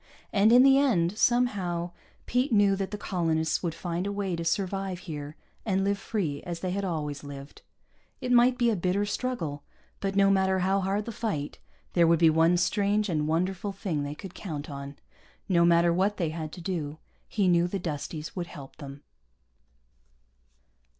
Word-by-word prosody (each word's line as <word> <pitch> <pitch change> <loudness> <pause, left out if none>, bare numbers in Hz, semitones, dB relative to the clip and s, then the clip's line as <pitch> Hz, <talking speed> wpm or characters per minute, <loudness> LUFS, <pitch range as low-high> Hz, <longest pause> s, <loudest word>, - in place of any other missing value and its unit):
And 210 +2 +5
in 250 +2 +8
the 270 0 +6
end, 195 -10 +2
somehow, 200 -8 +1 0.3
Pete 250 +3 0
knew 205 -2 +4
that 195 0 -3
the 210 - -5
colonists 165 -5 0
would 170 -3 -2
find 175 +2 -3
a - - -2
way 200 -3 -2
to 170 - -4
survive 195 +2 -1
here 150 -4 -7 0.3
and 195 -3 0
live 200 0 0
free 170 -11 -2
as 175 -2 -6
they 185 - -2
had 200 +2 -2
always 150 -6 -3
lived. 140 0 -10 0.6
It 255 -2 -3
might 245 +1 +5
be 240 -2 +3
a - - +1
bitter 185 +3 0
struggle, 205 - -3 0.4
but 195 0 -2
no 195 0 +5
matter 190 -1 +2
how 190 +2 +2
hard 195 +2 -1
the 230 - -4
fight, 200 -11 -3 0.3
there 170 -2 +4
would 165 0 +5
be 165 -1 +5
one 165 +2 +4
strange 205 +3 +1
and 155 -3 0
wonderful 185 +5 -1
thing 185 -6 -3
they 145 +1 -4
could 185 +2 -9
count 155 -6 -6
on. 140 0 -7 0.5
No 170 -3 +4
matter 170 0 +4
what 195 +4 +1
they 170 -4 0
had 155 -1 -5
to 180 - -8
do, 160 -4 -3 0.3
he 200 -4 +1
knew 175 -1 +4
the 195 - -3
Dusties 155 -2 -5
would 175 -2 -3
help 140 -6 -11
them. 140 0 -10
180 Hz, 185 wpm, -28 LUFS, 160-200 Hz, 0.6 s, in